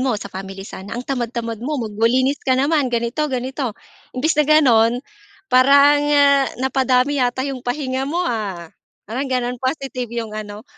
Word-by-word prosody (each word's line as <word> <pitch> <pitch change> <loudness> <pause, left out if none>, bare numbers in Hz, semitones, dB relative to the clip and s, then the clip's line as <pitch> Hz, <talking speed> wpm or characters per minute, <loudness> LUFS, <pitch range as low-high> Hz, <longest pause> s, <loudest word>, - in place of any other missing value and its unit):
mo, 255 -4 0
sa 200 -1 -9
family 195 0 -7
sana. 200 +3 -8
Ang 250 - -5
tamad-tamad 235 -3 -3
mo, 295 +4 -2
magwa 225 -1 0
linis 260 +3 +1
ka 260 -1 +1
naman, 285 0 +2
ganito, 235 +6 -1
ganito. 260 -2 -3 0.4
Imbes 310 +5 +1
na - - +3
gano'n, 240 -7 +5 0.6
parang 280 +3 +6
ah, 280 -2 +4
"Napadami 265 +1 +1
yata 250 +1 0
'yong 270 -2 -4
pahinga 260 +1 -3
mo 350 +3 -1
ah?" 195 - -4 0.3
Parang 260 +6 -4
gano'n, 250 -1 -2
positive 260 -2 -3
'yong 230 -2 -5
ano. 215 +1 -7
255 Hz, 160 wpm, -20 LUFS, 230-275 Hz, 0.6 s, parang